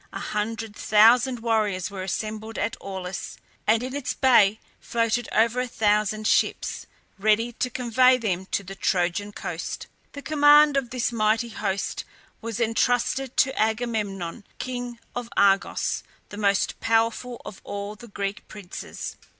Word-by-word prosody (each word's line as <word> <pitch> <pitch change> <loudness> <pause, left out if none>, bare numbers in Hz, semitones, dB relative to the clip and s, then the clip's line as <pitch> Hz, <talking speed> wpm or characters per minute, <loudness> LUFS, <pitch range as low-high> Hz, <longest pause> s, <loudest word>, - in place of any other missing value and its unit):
A - - -6
hundred 215 0 -3
thousand 235 +4 +4
warriors 210 -5 0
were 195 -2 -6
assembled 215 +3 -4
at 205 +2 -1
Aulis, 190 -2 -6 0.3
and 225 +2 +3
in 260 +2 -4
its 285 -2 -3
bay 220 -5 +5 0.2
floated 230 0 -1
over 230 +2 +2
a 250 - -1
thousand 215 -1 +1
ships, - - +1 0.3
ready 215 +3 +2
to 250 - -2
convey 250 +1 +4
them 190 -6 -2
to 200 - -1
the 195 0 -8
Trojan 190 +2 0
coast. - - -5 0.3
The 285 - -8
command 295 -1 +6
of 270 -3 0
this 245 -1 -1
mighty 225 +1 +1
host 200 -3 -3 0.4
was 230 0 -4
intrusted 245 +3 +1
to 265 - +3
Agamemnon, 215 -4 -1
king 245 -1 -5 0.2
of 245 -1 -4
Argos, 195 -1 +2 0.3
the 205 - -9
most 200 -2 +1
powerful 230 +2 0
of 195 - -9
all 200 +1 -5
the 235 +3 -12
Greek 200 -1 -4
princes. 200 -4 -8
220 Hz, 140 wpm, -25 LUFS, 205-245 Hz, 0.4 s, command